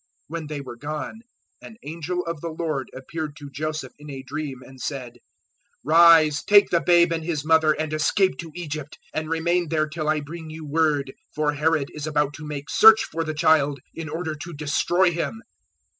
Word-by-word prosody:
002:013 - - -44 0.2
When 165 -1 -5
they 150 -1 -5
were 130 -3 -9
gone, 150 - -5 0.4
and 220 - -12
angel 170 +3 -4
of 165 -3 -4
the 170 - -4
Lord 155 -4 -3
appeared 150 +3 -6
to 145 -2 -10
Joseph 155 -1 -4
in 150 0 -11
a 135 -2 -7
dream 135 -2 -6
and 130 0 -14
said, 125 -4 -5 0.6
"Rise: 160 0 +6
take 205 -1 +5
the 170 - +3
babe 170 +2 +4
and 165 -1 -3
His 155 -3 -3
mother 160 -1 +4
and 155 0 -3
escape 185 +5 +2
to 165 -2 -7
Egypt, 155 -4 -6 0.2
and 155 0 -3
remain 170 +2 +1
there 155 -1 +1
till 155 0 -3
I 155 0 +2
bring 160 +2 -8
you 155 0 -8
word. 145 -3 +1 0.2
For 150 -1 +1
Herod 150 -1 0
is 150 0 -5
about 150 -1 0
to 150 0 -8
make 145 -1 -6
search 220 0 +7
for 165 - -3
the 155 -1 -4
child 145 -2 +3
in 165 -2 -6
order 160 +1 -3
to 155 +3 -8
destroy 165 +5 +2
Him." 175 +7 -4
155 Hz, 195 wpm, -24 LUFS, 145-165 Hz, 0.6 s, search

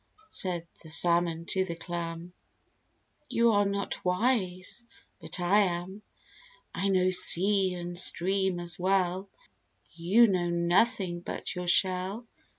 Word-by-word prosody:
said 175 -3 -2 0.2
the 160 - -13
Salmon 170 0 +1
to 190 +2 +1
the 170 -3 -5
Clam; 170 0 -6 1.0
"You 235 0 +3
are 205 -1 +2
not 200 0 -3
wise, 185 0 -1 0.4
but - - -6
I 180 +4 +3
am. 185 +1 -2 0.7
I 200 - -1
know 185 -1 +2
sea 190 +1 +3
and 175 0 -6
stream 190 +1 +1
as 175 -1 0
well, 190 +1 0 0.6
You 185 +8 +3
know 180 -5 0
nothing 175 +2 +1
but 175 - -5
your 180 0 -6
shell." 185 +5 +2
180 Hz, 125 wpm, -28 LUFS, 175-195 Hz, 1.0 s, You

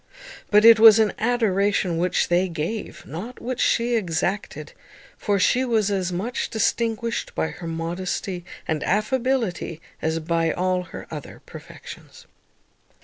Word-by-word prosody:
But 210 +1 +5
it 230 -1 +9
was 220 -1 +9
an 220 -2 +2
adoration 200 -6 +1
which 180 +1 +1
they 175 +2 +2
gave, 170 +7 -5
not 195 - -8
which 250 +1 -4
she 240 +1 +2
exacted; 190 0 -2 0.4
for 205 -1 0
she 245 +7 +2
was 220 -5 +1
as 185 -2 -1
much 210 +8 -3
distinguished 230 +1 -1
by 160 - -1
her 170 - -8
modesty 175 +3 -4 0.2
and 155 -1 -1
affability 220 -5 -1 0.2
as 160 0 -1
by 165 0 0
all 180 0 -1
her 165 - -9
other 150 -3 -9
perfections. - - -12
200 Hz, 135 wpm, -23 LUFS, 175-225 Hz, 0.4 s, it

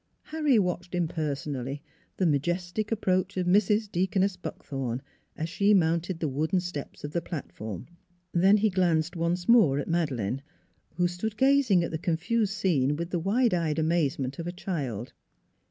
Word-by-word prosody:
Harry 300 -5 +2
watched 180 -2 -1
impersonally 145 -5 -2 0.4
the 190 - +1
majestic 175 - 0
approach 190 -2 0
of 180 - 0
Mrs. 210 +3 +3
Deaconess 190 +2 +1
Buckthorn, 135 -8 -5 0.3
as 160 - -2
she 200 +5 +3
mounted 170 0 +1
the 160 - 0
wooden 155 +7 0
steps 175 -5 -6
of 145 - -4
the 170 - -1
platform. 110 - -6 0.5
Then 190 +4 +5
he 210 0 +2
glanced 175 -2 +1
once 175 +1 -1
more 215 - +6
at 145 - -2
Madeleine, 135 - -1 0.5
who 175 +1 +2
stood 205 +5 -4
gazing 265 -9 +4
at 170 - -3
the 160 - -3
confused 195 +6 0
scene 150 -8 +1
with 170 +3 -4
the 175 - 0
wide 220 +6 +2
eyed 165 -3 0
amazement 155 -4 0
of 170 - -4
a - - -2
child. 140 - -4
175 Hz, 155 wpm, -28 LUFS, 150-190 Hz, 0.5 s, more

